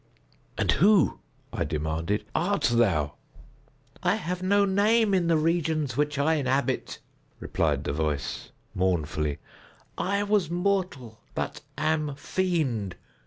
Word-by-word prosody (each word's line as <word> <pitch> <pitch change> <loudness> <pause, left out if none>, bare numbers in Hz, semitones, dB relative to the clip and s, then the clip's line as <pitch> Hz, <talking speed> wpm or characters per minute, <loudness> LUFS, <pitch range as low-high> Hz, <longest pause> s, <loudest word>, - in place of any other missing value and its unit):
"And - - +2
who," 195 0 +4 0.3
I - - -1
demanded, 80 +6 -2
"art 190 +5 0
thou?" 85 -11 +2 0.8
"I 180 +2 +2
have 180 -4 -3
no 200 +2 +3
name 205 +2 +3
in 180 -3 +2
the 165 -1 +4
regions 155 -3 0
which 150 0 0
I 150 +3 +3
inhabit," 135 -3 0 0.4
replied - - 0
the - - -2
voice, 75 -2 -2 0.2
mournfully; 80 -5 0 0.6
"I 200 +2 0
was 205 -5 +1
mortal, 175 - -1 0.2
but - - -3 0.2
am 155 -1 0
fiend. 140 - -1
155 Hz, 120 wpm, -27 LUFS, -, 0.8 s, who